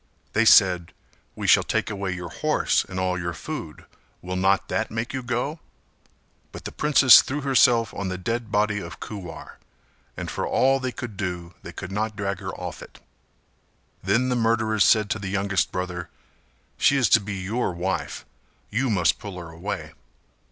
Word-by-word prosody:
They 115 Hz, +2 st, +3 dB
said 90 Hz, -5 st, +5 dB, 0.4 s
"We -, -, -5 dB
shall -, -, +6 dB
take -, -, -1 dB
away 100 Hz, -2 st, -3 dB
your 90 Hz, -2 st, -7 dB
horse -, -, +1 dB
and 95 Hz, -1 st, -6 dB
all 90 Hz, -1 st, 0 dB
your 85 Hz, -1 st, -3 dB
food, -, -, -7 dB, 0.4 s
will 90 Hz, +1 st, -4 dB
not 95 Hz, +1 st, +2 dB
that -, -, -1 dB
make 115 Hz, +2 st, -4 dB
you 130 Hz, -, -2 dB
go?" 125 Hz, +6 st, -2 dB, 0.9 s
But -, -, -10 dB
the -, -, -4 dB
princess 145 Hz, -4 st, +7 dB
threw 145 Hz, +3 st, -4 dB
herself 125 Hz, -5 st, +3 dB
on 100 Hz, -2 st, -4 dB
the 90 Hz, -, -3 dB
dead 115 Hz, +4 st, -3 dB
body 105 Hz, 0 st, +1 dB
of -, -, -9 dB
Kuwar 95 Hz, -6 st, -8 dB, 0.6 s
and -, -, -5 dB
for -, -, -3 dB
all 135 Hz, +1 st, +3 dB
they 130 Hz, -1 st, -3 dB
could 120 Hz, -5 st, -7 dB
do 90 Hz, -3 st, -4 dB
they -, -, -9 dB
could 90 Hz, -, -8 dB
not 110 Hz, +2 st, -2 dB
drag 100 Hz, -2 st, -3 dB
her 95 Hz, -2 st, -6 dB
off 90 Hz, -2 st, -7 dB
it. -, -, -13 dB, 1.0 s
Then 130 Hz, +3 st, +1 dB
the 125 Hz, -, +1 dB
murderers 110 Hz, -2 st, +2 dB
said 110 Hz, -2 st, +4 dB
to 110 Hz, -, -1 dB
the 100 Hz, -2 st, -5 dB
youngest 100 Hz, 0 st, 0 dB
brother 90 Hz, -2 st, -4 dB, 0.7 s
"She 140 Hz, -, +4 dB
is 130 Hz, -4 st, +3 dB
to -, -, +6 dB
be 105 Hz, -1 st, -5 dB
your 100 Hz, +4 st, -2 dB
wife: 90 Hz, +2 st, -3 dB, 0.5 s
you 120 Hz, +5 st, 0 dB
must 90 Hz, -6 st, +2 dB
pull 100 Hz, -3 st, -8 dB
her 85 Hz, -2 st, -8 dB
away." 80 Hz, -2 st, -5 dB
100 Hz, 180 wpm, -24 LUFS, 90-115 Hz, 1.0 s, princess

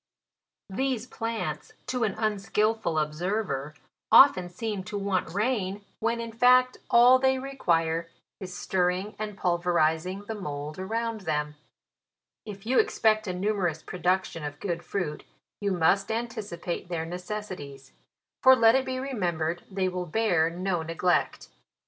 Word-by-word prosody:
These 255 Hz, +2 st, -1 dB
plants, 225 Hz, -2 st, -4 dB
to 250 Hz, -2 st, -1 dB
an 205 Hz, -3 st, 0 dB
unskilful 215 Hz, -3 st, 0 dB
observer, 155 Hz, -2 st, -2 dB, 0.4 s
often 185 Hz, -10 st, +7 dB
seem 205 Hz, +1 st, -4 dB
to 210 Hz, +1 st, -4 dB
want 195 Hz, -4 st, -1 dB
rain, 205 Hz, -1 st, -1 dB
when 230 Hz, +1 st, 0 dB
in 230 Hz, 0 st, -5 dB
fact 250 Hz, +2 st, +4 dB
all 245 Hz, +2 st, +7 dB
they 265 Hz, 0 st, +3 dB
re 270 Hz, +1 st, -6 dB
quire 165 Hz, -6 st, +1 dB, 0.3 s
is 185 Hz, -2 st, -7 dB
stirring 185 Hz, +2 st, 0 dB
and 210 Hz, -2 st, -5 dB
pulverizing 175 Hz, +1 st, +1 dB
the 225 Hz, -, -4 dB
mould 150 Hz, -5 st, -6 dB
around 225 Hz, +3 st, -2 dB
them. 150 Hz, -4 st, -2 dB, 0.9 s
If 200 Hz, -1 st, -8 dB
you 250 Hz, +3 st, +3 dB
expect 220 Hz, -, +2 dB
a 185 Hz, -, -1 dB
numerous 180 Hz, -4 st, -1 dB
production 180 Hz, -2 st, -1 dB
of 145 Hz, 0 st, -6 dB
good 175 Hz, -3 st, -3 dB
fruit, 175 Hz, -7 st, -3 dB, 0.4 s
you 205 Hz, -, -1 dB
must 190 Hz, +4 st, +2 dB
anticipate 215 Hz, -8 st, -4 dB
their 165 Hz, -2 st, -2 dB
necessi 185 Hz, +4 st, -5 dB
ties; 140 Hz, -2 st, -11 dB, 0.5 s
for 260 Hz, 0 st, +8 dB
let 225 Hz, -2 st, +6 dB
it 265 Hz, 0 st, +2 dB
be 260 Hz, 0 st, -2 dB
remembered 175 Hz, -11 st, -2 dB
they 190 Hz, -1 st, -1 dB
will 180 Hz, -1 st, -3 dB
bear 175 Hz, -4 st, +2 dB
no 180 Hz, 0 st, -2 dB
neglect. 165 Hz, +2 st, 0 dB
195 Hz, 140 wpm, -27 LUFS, 170-225 Hz, 0.9 s, for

